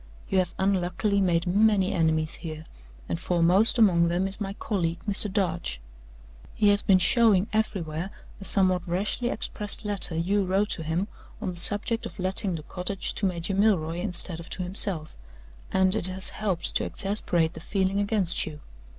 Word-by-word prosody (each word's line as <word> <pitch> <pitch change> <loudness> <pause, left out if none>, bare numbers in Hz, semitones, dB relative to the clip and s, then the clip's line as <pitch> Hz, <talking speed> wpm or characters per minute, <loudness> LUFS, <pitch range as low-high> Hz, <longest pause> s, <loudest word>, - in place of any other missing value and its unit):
You 190 - +2
have 180 -2 -1
unluckily 190 +1 0
made 170 -3 +1
many 200 +1 +3
enemies 160 -2 0
here, 155 -2 -7 0.4
and 165 - -3
foremost 180 +6 +3
among 175 -7 +4
them 175 +3 0
is 195 +2 +1
my 195 -1 -3
colleague, 175 -6 -2
Mr. 205 0 +2
Darch. 85 - -1 0.8
He 210 - +3
has 205 0 +4
been 195 - +4
showing 210 -1 +4
everywhere 180 -5 -2 0.3
a 195 - -6
somewhat 185 -2 +2
rashly 205 +7 -1
expressed 210 -1 -3
letter 200 -5 -3
you 195 +5 +1
wrote 195 +3 +1
to - - -1
him 165 +5 -1 0.3
on 185 - -3
the - - -9
subject 205 +6 +2
of - - -14
letting 185 0 -1
the 155 - -7
cottage 185 +4 -3
to 200 - 0
Major 180 +1 -3
Milroy 185 -5 +1
instead 180 -3 -3
of 170 - -10
to 185 - -2
himself, 180 -3 -1 0.6
and 190 0 +3
it 210 -4 +2
has 185 +1 -5
helped 200 -5 -3
to - - -2
exasperate 175 -5 0
the 160 - -9
feeling 190 +3 -1
against 200 -4 +1
you. 150 -2 -8
185 Hz, 170 wpm, -26 LUFS, 170-205 Hz, 0.8 s, among